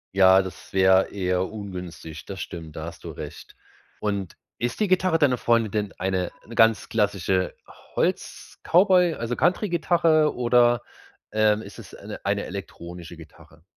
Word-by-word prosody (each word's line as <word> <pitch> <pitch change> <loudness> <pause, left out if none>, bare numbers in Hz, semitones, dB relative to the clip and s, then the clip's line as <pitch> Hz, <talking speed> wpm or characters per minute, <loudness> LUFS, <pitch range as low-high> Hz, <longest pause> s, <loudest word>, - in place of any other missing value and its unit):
Ja, 95 0 +6
das 95 -1 -10
wäre 95 0 +4
eher 90 -2 -1
ungünstig. 90 -6 -8
Das 95 -1 -7
stimmt. 80 -3 -7
Da 80 - -5
hast 85 0 -10
du - - -6
recht. - - -9 0.4
Und 100 -3 -3 0.2
ist 120 - -2
die 210 - +2
Gitarre 185 -2 +2
deiner 135 -5 +3
Freundin 115 -3 +2
denn 105 -2 -2
eine 95 -1 -1
'ne 115 - -11
ganz 115 -1 +3
klassische 100 -4 0 0.4
Holz-Cowboy, 180 -2 +2
also 115 +1 -3
Country-Gitarre 170 -4 +2
oder, 120 -1 +3 0.5
ähm, 110 0 +2
ist - - -11
es - - -12
eine - - -9
eine - - 0
elektronische 85 -1 -8
Gitarre? 80 0 -16
105 Hz, 145 wpm, -24 LUFS, 90-125 Hz, 0.5 s, Ja